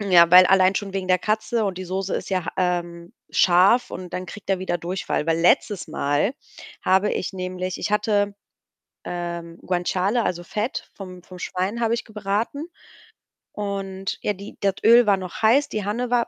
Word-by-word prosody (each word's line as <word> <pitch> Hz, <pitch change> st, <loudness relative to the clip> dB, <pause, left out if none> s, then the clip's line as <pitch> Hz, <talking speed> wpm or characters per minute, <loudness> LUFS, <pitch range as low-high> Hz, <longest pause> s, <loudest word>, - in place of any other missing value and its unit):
Ja, 180 Hz, -4 st, +6 dB
weil 180 Hz, +1 st, +9 dB
allein 190 Hz, 0 st, +4 dB
schon 195 Hz, -1 st, -3 dB
wegen 190 Hz, -1 st, -3 dB
der 185 Hz, 0 st, +3 dB
Katze, 220 Hz, +2 st, 0 dB
und 190 Hz, -2 st, -2 dB
die 185 Hz, -, -5 dB
Soße 190 Hz, +1 st, -3 dB
ist -, -, -6 dB
ja, 185 Hz, -3 st, -1 dB
ähm, 175 Hz, -1 st, -2 dB, 0.2 s
scharf 190 Hz, +7 st, +4 dB
und 180 Hz, -1 st, -7 dB
dann 185 Hz, 0 st, -4 dB
kriegt 200 Hz, +2 st, -8 dB
er 195 Hz, -, +2 dB
wieder 185 Hz, -1 st, -2 dB
Durchfall. 175 Hz, -2 st, -3 dB
Weil 165 Hz, 0 st, +1 dB
letztes 180 Hz, +2 st, +2 dB
Mal 155 Hz, -, 0 dB, 0.5 s
habe 190 Hz, +2 st, +3 dB
ich -, -, -3 dB
nämlich 185 Hz, 0 st, -4 dB
ich 210 Hz, -, -3 dB
hatte 205 Hz, -1 st, +1 dB, 0.7 s
ähm, 170 Hz, -1 st, -5 dB
Guanciale, 185 Hz, +5 st, 0 dB
also, 175 Hz, -1 st, -2 dB
Fett 215 Hz, +7 st, -4 dB
vom 185 Hz, -2 st, -10 dB
vom 180 Hz, 0 st, -12 dB
Schwein 190 Hz, +6 st, -3 dB
habe 230 Hz, 0 st, +2 dB
ich 235 Hz, -, -4 dB
gebraten. 215 Hz, +7 st, -3 dB, 0.9 s
Und 195 Hz, -2 st, -4 dB
ja, 210 Hz, -, 0 dB
die 200 Hz, +1 st, -11 dB
das 195 Hz, -1 st, +1 dB
Öl 235 Hz, +1 st, +7 dB
war 200 Hz, -2 st, +4 dB
noch 185 Hz, -2 st, -7 dB
heiß, 240 Hz, +7 st, +4 dB
die 215 Hz, -2 st, -3 dB
Hanne 235 Hz, +4 st, -2 dB
war 240 Hz, -1 st, +2 dB
190 Hz, 180 wpm, -23 LUFS, 180-210 Hz, 0.9 s, weil